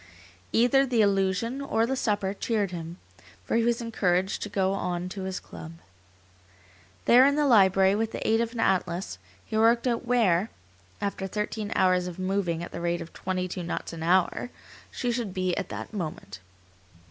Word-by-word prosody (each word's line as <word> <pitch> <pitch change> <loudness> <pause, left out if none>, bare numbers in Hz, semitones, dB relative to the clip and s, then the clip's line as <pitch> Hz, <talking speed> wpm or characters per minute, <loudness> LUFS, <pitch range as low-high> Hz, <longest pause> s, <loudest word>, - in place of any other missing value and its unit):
Either 250 +4 +4
the 245 -5 +2
illusion, 200 +6 +1
or 230 -5 +1
the 265 +3 -1
supper 205 -6 0
cheered 205 -2 -1
him, 170 0 -6 0.5
for - - -1
he 230 - +3
was 235 0 +1
encouraged 190 -5 0
to 210 - -4
go 195 -1 +1
on 180 -2 -2
to 190 +1 -6
his 190 -1 -3
club. 160 0 -10 1.3
There 245 +2 +7
in 280 +1 +4
the 300 0 +2
library, 195 -5 +5
with 220 +2 -1
the - - -4
aid 225 +1 +3
of 230 -1 -2
an 235 - -6
atlas, 180 - 0 0.3
he - - -6
worked 230 +2 +4
out 235 -2 0
where, 225 -5 +2 0.5
after 200 -1 -2
thirteen 210 +1 -3
hours 185 -1 +3
of 180 - -7
moving 185 -3 -1
at - - -7
the 170 - -6
rate 170 0 0
of 165 - -9
twenty 185 -1 -2
two 180 0 -5
knots 170 0 -4
an 165 - -7
hour, 180 +7 +2 0.4
she 245 - -2
should 230 -6 -3
be 185 -1 0
at 195 - -4
that - - -7
moment. 155 - -5
195 Hz, 180 wpm, -27 LUFS, 180-230 Hz, 1.3 s, There